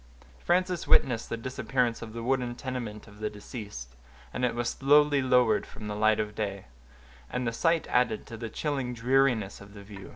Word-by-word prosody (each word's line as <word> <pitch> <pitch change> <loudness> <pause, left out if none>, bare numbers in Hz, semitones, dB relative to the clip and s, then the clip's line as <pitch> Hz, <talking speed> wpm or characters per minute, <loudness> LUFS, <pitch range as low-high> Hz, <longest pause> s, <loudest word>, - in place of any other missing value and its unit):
Frances 180 - 0
witnessed 115 -3 +3
the 115 - -2
disappearance 125 0 -1
of 115 -1 -7
the 115 0 -5
wooden 125 -1 0
tenement 120 -5 -5
of 105 0 -15
the 110 0 -1
deceased, 105 - -8 0.4
as 125 - -3
it 125 -2 +1
was 120 0 0
slowly 145 +1 +4
lowered 125 -4 +3
from 105 - -9
the 105 - -3
light 110 0 +3
of 105 -1 -2
day; 100 -3 -4 0.6
and 125 0 -2
the 115 - -1
sight 165 +6 +2
added 125 -3 +1
to 115 - -8
the 115 0 -5
chilling 135 -1 -2
dreariness 120 -4 +2
of 100 +1 -13
the 100 - -10
view. 100 -1 -10
115 Hz, 190 wpm, -28 LUFS, 105-130 Hz, 0.6 s, slowly